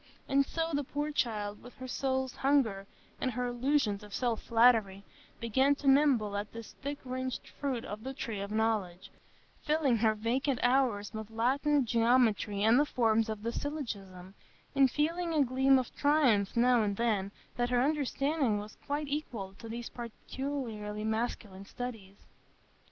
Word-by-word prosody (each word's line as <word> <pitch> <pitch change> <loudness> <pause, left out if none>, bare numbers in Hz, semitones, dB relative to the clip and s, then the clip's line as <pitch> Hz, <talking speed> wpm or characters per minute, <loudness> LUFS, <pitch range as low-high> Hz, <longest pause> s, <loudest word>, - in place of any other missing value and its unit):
And 275 0 +4
so 330 0 -2
the 285 0 +1
poor 290 +3 -3
child, 210 -7 -2
with 245 - -13
her 255 - -8
soul's 260 0 -2
hunger 235 -9 +1 0.3
and 260 - +1
her 250 0 -2
illusions 245 -3 0
of 210 -1 -9
self 240 -3 0
flattery, 225 -4 +3 0.4
began 265 +5 +2
to 280 - -5
nibble 270 -7 +4
at 205 +1 -3
this 230 -1 -8
thick 285 +1 -3
rinded 255 0 -4
fruit 265 -4 -2
of 210 -1 -7
the 265 - -4
tree 225 -7 -4
of 200 0 -4
knowledge, 210 -5 -1 0.5
filling 300 -5 +2
her 220 0 +2
vacant 245 +5 0
hours 245 -5 +2
with 220 -1 -6
Latin, 270 +5 +1
geometry, 230 -3 +2
and 225 +4 +5
the 295 - +4
forms 225 -3 +2
of 215 -1 -5
the 230 - -1
syllogism, 200 -12 -5 0.4
and 275 -1 +5
feeling 330 +5 -1
a 295 - +5
gleam 265 +1 +4
of 255 -2 -3
triumph 255 -10 +3
now 245 0 +5
and 200 -2 -1
then 210 -4 0 0.2
that 240 0 0
her 250 -1 +2
understanding 280 -3 +1
was 210 +1 -8
quite 295 +1 -1
equal 240 -10 -4
to 225 - -9
these 235 +1 -5
peculiarly 230 -3 -5
masculine 220 -3 -3
studies. 220 -6 -7
240 Hz, 160 wpm, -31 LUFS, 215-275 Hz, 0.5 s, and